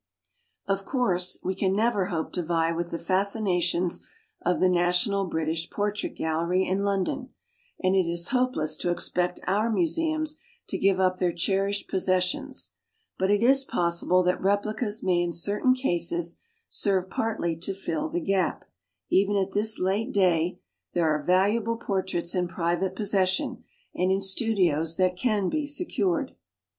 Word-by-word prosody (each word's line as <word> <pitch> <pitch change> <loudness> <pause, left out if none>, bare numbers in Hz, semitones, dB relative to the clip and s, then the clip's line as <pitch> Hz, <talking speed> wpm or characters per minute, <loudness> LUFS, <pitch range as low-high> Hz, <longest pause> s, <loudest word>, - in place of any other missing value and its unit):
Of 195 0 -1
course 185 -8 +1
we 185 - -1
can 190 0 0
never 210 -3 +1
hope 165 -5 -3
to 180 - -1
vie 165 0 +1
with 170 +1 -3
the 170 - -3
fascinations 185 -3 0 0.4
of 180 - +1
the 185 - +4
National 180 +3 +2
British 160 0 -2
Portrait 210 0 -2
Gallery 170 +4 0
in 190 +2 0
London, 200 -2 -1 0.5
and 185 +1 +3
it 185 -3 +3
is 170 0 -1
hopeless 250 - 0
to 175 - -2
expect 180 0 -1
our 210 +5 +1
mu 285 +10 +2
seums 315 -1 -1 0.3
to - - -2
give 195 -1 +3
up 185 -1 +2
their 180 -1 +2
cherished 195 +4 0
pos 190 - -1
sessions; 185 -1 0 0.5
but 190 +1 +1
it 205 +2 +3
is 270 +2 +5
possible 175 -3 +1
that 180 0 +1
replicas 205 +3 0
may 180 -2 +2
in 175 -1 -1
certain 205 +9 +2
cases 170 -8 -1 0.3
serve 190 -2 0
partly 220 -7 -1
to 175 +4 -3
fill 300 +11 -3
the 340 +3 -1
gap, 195 - 0
while - - -26 0.4
even 200 +2 +3
at 195 -1 0
this 215 +2 +1
late 200 +7 0
day 180 -3 +2 0.3
there 170 -2 +2
are 150 - -1
valuable 205 +7 +2
portraits 190 -5 -2
in 180 -1 0
private 175 +2 -1
possession 190 -2 0 0.3
and 185 +1 +1
in 190 - +2
studios 190 -6 +1
that 185 -1 +2
can 210 -2 0
be 300 +7 -1
secured. 285 - -1
190 Hz, 160 wpm, -26 LUFS, 175-205 Hz, 0.5 s, is